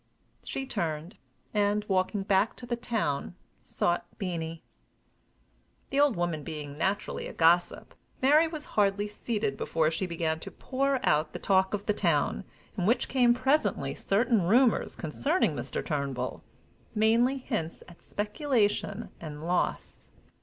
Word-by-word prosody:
She 270 Hz, -, -4 dB
turned, 170 Hz, -, -3 dB, 0.4 s
and, 205 Hz, 0 st, +1 dB
walking 190 Hz, +1 st, +1 dB
back 195 Hz, +2 st, +2 dB
to 245 Hz, -, -8 dB
the 240 Hz, 0 st, -1 dB
town, 215 Hz, -11 st, -2 dB, 0.3 s
sought 175 Hz, 0 st, -1 dB
Beenie. 165 Hz, -4 st, -4 dB, 1.3 s
The 275 Hz, -, +1 dB
old 290 Hz, -5 st, +4 dB
woman 170 Hz, -3 st, -1 dB
being 145 Hz, -2 st, -6 dB
naturally 190 Hz, +6 st, -1 dB
a -, -, -8 dB
gossip, 170 Hz, +2 st, +2 dB, 0.3 s
Mary 300 Hz, +5 st, +5 dB
was 310 Hz, -2 st, -6 dB
hardly 205 Hz, 0 st, +2 dB
seated 210 Hz, -, -2 dB
before 160 Hz, -1 st, +1 dB
she 175 Hz, +3 st, -2 dB
began 160 Hz, -2 st, -1 dB
to -, -, -7 dB
pour 275 Hz, 0 st, -1 dB
out 150 Hz, +1 st, +2 dB
the -, -, -3 dB
talk 190 Hz, 0 st, +2 dB
of 205 Hz, -, -6 dB
the 210 Hz, -, +2 dB
town, 170 Hz, -2 st, +1 dB, 0.3 s
in 185 Hz, -3 st, 0 dB
which 240 Hz, +2 st, +2 dB
came 245 Hz, -2 st, +4 dB
presently 270 Hz, +5 st, +1 dB
certain 225 Hz, +2 st, +2 dB
rumors 230 Hz, +7 st, +3 dB
concerning 280 Hz, -, 0 dB
Mr. -, -, -4 dB
Turnbull 140 Hz, -5 st, -3 dB, 0.5 s
mainly 230 Hz, +5 st, +3 dB
hints 220 Hz, -, -4 dB
at 175 Hz, -, -15 dB
speculation 210 Hz, -1 st, -1 dB
and 155 Hz, -1 st, -7 dB
loss. 175 Hz, +1 st, -2 dB
200 Hz, 140 wpm, -29 LUFS, 165-240 Hz, 1.3 s, Mary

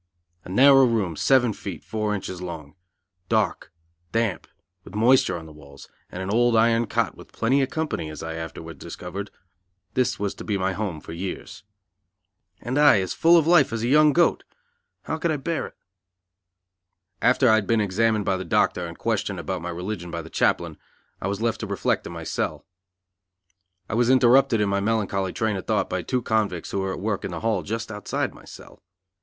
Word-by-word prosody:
A -, -, -11 dB
narrow 135 Hz, +6 st, +7 dB
room, 105 Hz, -8 st, 0 dB
seven 125 Hz, -, +3 dB
feet, 95 Hz, -5 st, -7 dB
four 110 Hz, -1 st, -2 dB
inches 95 Hz, -2 st, -6 dB
long; 80 Hz, -5 st, -7 dB, 0.6 s
dark, 110 Hz, -4 st, 0 dB, 0.4 s
damp, 115 Hz, -3 st, -1 dB, 0.4 s
with 100 Hz, -, -12 dB
moisture 115 Hz, -4 st, +4 dB
on 80 Hz, -, -9 dB
the 80 Hz, -, -12 dB
walls, 70 Hz, -2 st, -14 dB, 0.2 s
and 95 Hz, -, -5 dB
an 95 Hz, -, -3 dB
old 120 Hz, +1 st, +3 dB
iron 115 Hz, +1 st, +3 dB
cot 110 Hz, -5 st, -1 dB
with -, -, -14 dB
plenty 130 Hz, +5 st, +1 dB
of 135 Hz, -, 0 dB
company, 155 Hz, -, -3 dB
as 75 Hz, 0 st, -8 dB
I 80 Hz, 0 st, -4 dB
afterwards 80 Hz, 0 st, -7 dB
discovered 95 Hz, +3 st, -7 dB, 0.6 s
this 125 Hz, -1 st, +1 dB
was 100 Hz, -1 st, -2 dB
to -, -, -9 dB
be 105 Hz, -2 st, -1 dB
my 95 Hz, 0 st, 0 dB
home 95 Hz, -7 st, -4 dB
for -, -, -10 dB
years. 95 Hz, +4 st, -6 dB, 1.0 s
And 130 Hz, +4 st, -1 dB
I 145 Hz, -8 st, +6 dB
as 95 Hz, -2 st, -2 dB
full 170 Hz, +1 st, +5 dB
of 160 Hz, -, +3 dB
life 165 Hz, -6 st, +5 dB
as 115 Hz, -1 st, -3 dB
a -, -, 0 dB
young 150 Hz, +3 st, +5 dB
goat! 170 Hz, +3 st, +2 dB, 0.6 s
How 160 Hz, -, -3 dB
could 170 Hz, -, 0 dB
I 155 Hz, -, 0 dB
bear 160 Hz, +4 st, -2 dB
it? -, -, -16 dB, 1.5 s
After 130 Hz, +1 st, +4 dB
I 110 Hz, -, +6 dB
had 110 Hz, -2 st, +2 dB
been 115 Hz, -1 st, +3 dB
examined 105 Hz, +1 st, +1 dB
by 95 Hz, -1 st, +1 dB
the 95 Hz, -, -4 dB
doctor 90 Hz, -1 st, +1 dB
and 85 Hz, -, -10 dB
questioned 105 Hz, -4 st, -2 dB
about 90 Hz, +2 st, -4 dB
my 85 Hz, -, -5 dB
religion 90 Hz, +1 st, -5 dB
by 85 Hz, -1 st, -5 dB
the 80 Hz, -, -12 dB
chaplain, -, -, 0 dB, 0.4 s
I -, -, -2 dB
was 100 Hz, +3 st, -3 dB
left 115 Hz, -1 st, 0 dB
to 110 Hz, -, -4 dB
reflect 100 Hz, -1 st, -1 dB
in -, -, -8 dB
my -, -, -7 dB
cell. -, -, -3 dB, 1.2 s
I -, -, -5 dB
was 120 Hz, +1 st, +2 dB
interrupted 130 Hz, -2 st, +5 dB
in 105 Hz, -, +1 dB
my 100 Hz, 0 st, +1 dB
melancholy 100 Hz, -3 st, 0 dB
train 110 Hz, -1 st, -1 dB
of 95 Hz, -, -8 dB
thought -, -, 0 dB
by -, -, -1 dB
two 125 Hz, -2 st, -2 dB
convicts 105 Hz, -7 st, -1 dB
who 100 Hz, -, -1 dB
were 95 Hz, 0 st, -2 dB
at -, -, -6 dB
work 105 Hz, 0 st, -2 dB
in -, -, -3 dB
the 85 Hz, -2 st, -6 dB
hall 110 Hz, -4 st, 0 dB
just 110 Hz, +5 st, -4 dB
outside 105 Hz, -1 st, -3 dB
my -, -, -16 dB
cell. -, -, -13 dB
105 Hz, 200 wpm, -24 LUFS, 95-120 Hz, 1.5 s, narrow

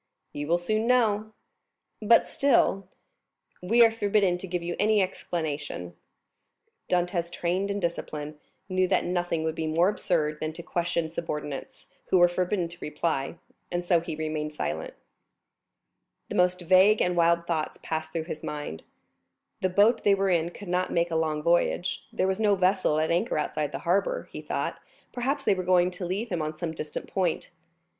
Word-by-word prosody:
"You 145 Hz, 0 st, -4 dB
will 170 Hz, +2 st, +3 dB
soon 215 Hz, +6 st, -1 dB
know." 220 Hz, -4 st, +2 dB, 0.7 s
"But 230 Hz, +2 st, +5 dB
still——" 195 Hz, -8 st, +2 dB, 0.7 s
"We 230 Hz, +6 st, +6 dB
are 225 Hz, -, +3 dB
forbidden 205 Hz, -4 st, +1 dB
to 190 Hz, -, -7 dB
give 175 Hz, -1 st, -3 dB
you 175 Hz, 0 st, -3 dB
any 215 Hz, 0 st, +3 dB
explanation." 150 Hz, -, -3 dB, 0.9 s
Dantès, 175 Hz, -1 st, 0 dB
trained 180 Hz, +4 st, -1 dB
in 200 Hz, 0 st, -1 dB
discipline, 155 Hz, -4 st, -4 dB, 0.3 s
knew 185 Hz, -1 st, +1 dB
that 185 Hz, 0 st, +2 dB
nothing 175 Hz, -2 st, -1 dB
would 160 Hz, 0 st, -1 dB
be 160 Hz, 0 st, -3 dB
more 165 Hz, +4 st, +3 dB
absurd 155 Hz, -7 st, -1 dB
than 155 Hz, 0 st, -3 dB
to 170 Hz, -, -8 dB
question 170 Hz, -2 st, -1 dB
subordinates, 150 Hz, -4 st, -5 dB, 0.2 s
who 185 Hz, -, +4 dB
were 175 Hz, 0 st, +7 dB
forbidden 180 Hz, +1 st, -1 dB
to 170 Hz, +1 st, -13 dB
reply; 150 Hz, -1 st, -2 dB, 0.4 s
and 175 Hz, 0 st, -2 dB
so 175 Hz, -1 st, +4 dB
he 165 Hz, -1 st, -5 dB
remained 155 Hz, -1 st, -3 dB
silent. 80 Hz, -, -3 dB, 1.3 s
The -, -, -4 dB
most 180 Hz, 0 st, +2 dB
vague 190 Hz, +5 st, +5 dB
and 180 Hz, 0 st, +1 dB
wild 170 Hz, 0 st, +3 dB
thoughts 160 Hz, -3 st, -2 dB
passed 160 Hz, 0 st, -3 dB
through 165 Hz, -1 st, -2 dB
his 155 Hz, -2 st, -6 dB
mind. 145 Hz, -, -5 dB, 0.8 s
The 185 Hz, -, +2 dB
boat 210 Hz, +5 st, +4 dB
they 200 Hz, -1 st, +5 dB
were 195 Hz, -1 st, +1 dB
in 170 Hz, -1 st, +2 dB
could 200 Hz, +3 st, -11 dB
not 180 Hz, +1 st, 0 dB
make 170 Hz, 0 st, +1 dB
a -, -, -1 dB
long 155 Hz, -2 st, 0 dB
voyage; 175 Hz, +2 st, +1 dB
there -, -, 0 dB
was 190 Hz, +2 st, -1 dB
no 210 Hz, -2 st, +4 dB
vessel 185 Hz, -4 st, +2 dB
at 160 Hz, +1 st, +1 dB
anchor 175 Hz, +6 st, +1 dB
outside 150 Hz, -1 st, -1 dB
the 135 Hz, -, -3 dB
harbor; 200 Hz, -, 0 dB
he -, -, -7 dB
thought, -, -, -3 dB, 0.3 s
perhaps, 265 Hz, +4 st, -1 dB
they -, -, +4 dB
were 185 Hz, -, -2 dB
going 180 Hz, 0 st, +3 dB
to 180 Hz, 0 st, -5 dB
leave 205 Hz, +6 st, -2 dB
him 175 Hz, -3 st, -1 dB
on 155 Hz, 0 st, -4 dB
some 165 Hz, 0 st, -3 dB
distant 155 Hz, -2 st, -6 dB
point. 180 Hz, -4 st, -1 dB
175 Hz, 175 wpm, -27 LUFS, 160-190 Hz, 1.3 s, were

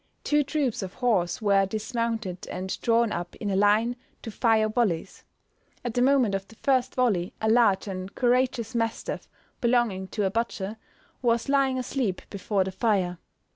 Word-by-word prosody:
Two 295 Hz, 0 st, +3 dB
troops 280 Hz, -5 st, -1 dB
of 190 Hz, 0 st, -6 dB
horse 220 Hz, -7 st, 0 dB
were 195 Hz, -2 st, +4 dB
dismounted, 220 Hz, -2 st, -3 dB
and 185 Hz, +1 st, -4 dB
drawn 230 Hz, -1 st, +3 dB
up 175 Hz, 0 st, -4 dB
in 205 Hz, -2 st, -3 dB
a -, -, 0 dB
line 210 Hz, +4 st, +3 dB, 0.3 s
to 225 Hz, -, -5 dB
fire 220 Hz, -1 st, +3 dB
volleys. 215 Hz, -7 st, -1 dB, 0.6 s
At 240 Hz, -, -2 dB
the 245 Hz, -, +1 dB
moment 255 Hz, -5 st, +4 dB
of 195 Hz, 0 st, -2 dB
the 225 Hz, -, -16 dB
first 260 Hz, 0 st, +1 dB
volley 205 Hz, -9 st, +1 dB
a 220 Hz, -, -1 dB
large 220 Hz, -4 st, +4 dB
and 185 Hz, 0 st, -6 dB
courageous 250 Hz, -2 st, +1 dB
mastiff, 230 Hz, -1 st, -2 dB, 0.3 s
belonging 235 Hz, -6 st, +1 dB
to 205 Hz, +1 st, -2 dB
a 190 Hz, -, +1 dB
butcher, 220 Hz, -2 st, -2 dB, 0.4 s
was 235 Hz, -1 st, +1 dB
lying 275 Hz, -2 st, +3 dB
asleep 250 Hz, -6 st, -2 dB
before 200 Hz, 0 st, 0 dB
the 190 Hz, -, -4 dB
fire. 185 Hz, -5 st, 0 dB
225 Hz, 165 wpm, -26 LUFS, 195-245 Hz, 0.6 s, were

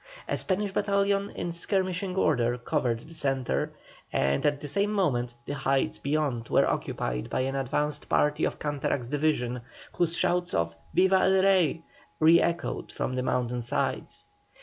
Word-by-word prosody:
A -, -, 0 dB
Spanish 200 Hz, +1 st, -1 dB
battalion 200 Hz, 0 st, +1 dB
in 175 Hz, -, -3 dB
skirmishing 185 Hz, +1 st, -1 dB
order 125 Hz, -9 st, +2 dB
covered 120 Hz, -3 st, -1 dB
the 160 Hz, -, -12 dB
centre, 135 Hz, -5 st, -1 dB, 0.4 s
and 70 Hz, +1 st, +1 dB
at 145 Hz, -1 st, +1 dB
the 145 Hz, -, -6 dB
same 200 Hz, +8 st, 0 dB
moment 125 Hz, -12 st, 0 dB
the -, -, -4 dB
heights 135 Hz, -1 st, 0 dB
beyond 140 Hz, -5 st, -1 dB
were -, -, +4 dB
occupied -, -, -2 dB
by -, -, 0 dB
an 135 Hz, +1 st, -1 dB
advanced 145 Hz, +2 st, -2 dB
party 150 Hz, 0 st, +2 dB
of -, -, 0 dB
Canterac's 140 Hz, -4 st, -2 dB
division, 140 Hz, -5 st, 0 dB, 0.3 s
whose 170 Hz, -1 st, 0 dB
shouts 180 Hz, 0 st, +1 dB
of 85 Hz, 0 st, 0 dB, 0.2 s
"Viva 190 Hz, 0 st, +5 dB
el 190 Hz, 0 st, +4 dB
Rey!" 180 Hz, -5 st, +3 dB, 0.4 s
re 165 Hz, +2 st, +6 dB
echoed 170 Hz, 0 st, -2 dB
from 130 Hz, -, -3 dB
the 130 Hz, -, -1 dB
mountain 125 Hz, -1 st, -1 dB
sides. 120 Hz, -, -2 dB
150 Hz, 155 wpm, -28 LUFS, 125-180 Hz, 0.4 s, re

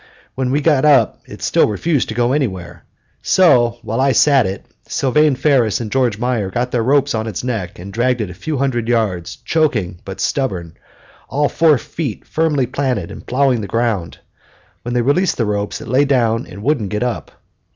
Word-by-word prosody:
When 130 Hz, -1 st, -2 dB
we 145 Hz, +3 st, +1 dB
got 145 Hz, -3 st, +3 dB
up 150 Hz, -2 st, +4 dB
it -, -, -10 dB
still -, -, +3 dB
refused 140 Hz, -, 0 dB
to 110 Hz, -, -4 dB
go 120 Hz, +1 st, +1 dB
anywhere; 95 Hz, -, -3 dB, 0.4 s
so, 125 Hz, -10 st, +4 dB
while 115 Hz, +3 st, -2 dB
I 135 Hz, 0 st, +3 dB
sat 135 Hz, -3 st, +4 dB
it, 95 Hz, +1 st, -6 dB, 0.2 s
Sylvane 145 Hz, +2 st, +2 dB
Ferris 125 Hz, -7 st, +2 dB
and 110 Hz, -3 st, -5 dB
George 125 Hz, -6 st, +1 dB
Meyer 120 Hz, -4 st, -1 dB
got 125 Hz, +5 st, -2 dB
their 120 Hz, -, +1 dB
ropes 140 Hz, +4 st, +2 dB
on 110 Hz, 0 st, -2 dB
its 110 Hz, -1 st, -4 dB
neck 110 Hz, -9 st, -3 dB
and 95 Hz, +3 st, -9 dB
dragged 125 Hz, +2 st, +1 dB
it 105 Hz, -5 st, -3 dB
a -, -, -8 dB
few 150 Hz, -, -4 dB
hundred 125 Hz, -4 st, -1 dB
yards, 105 Hz, -8 st, -1 dB
choking 110 Hz, -, 0 dB
but 95 Hz, 0 st, -8 dB
stubborn, 95 Hz, -, -2 dB, 0.6 s
all 145 Hz, +1 st, +1 dB
four 160 Hz, -4 st, +4 dB
feet 130 Hz, -1 st, -5 dB
firmly 155 Hz, -4 st, 0 dB
planted 125 Hz, -8 st, -2 dB
and -, -, -11 dB
plowing 130 Hz, -2 st, +2 dB
the 100 Hz, -, -5 dB
ground. 110 Hz, -5 st, -1 dB, 0.6 s
When 120 Hz, +1 st, -4 dB
they 120 Hz, -, +2 dB
released 170 Hz, +8 st, +1 dB
the 115 Hz, -, +1 dB
ropes 105 Hz, 0 st, -2 dB
it -, -, -9 dB
lay 130 Hz, +5 st, +3 dB
down 120 Hz, -4 st, +1 dB
and 100 Hz, +3 st, -10 dB
wouldn't 130 Hz, -7 st, 0 dB
get 105 Hz, +3 st, -2 dB
up. 125 Hz, -2 st, -4 dB
120 Hz, 195 wpm, -18 LUFS, 105-140 Hz, 0.6 s, up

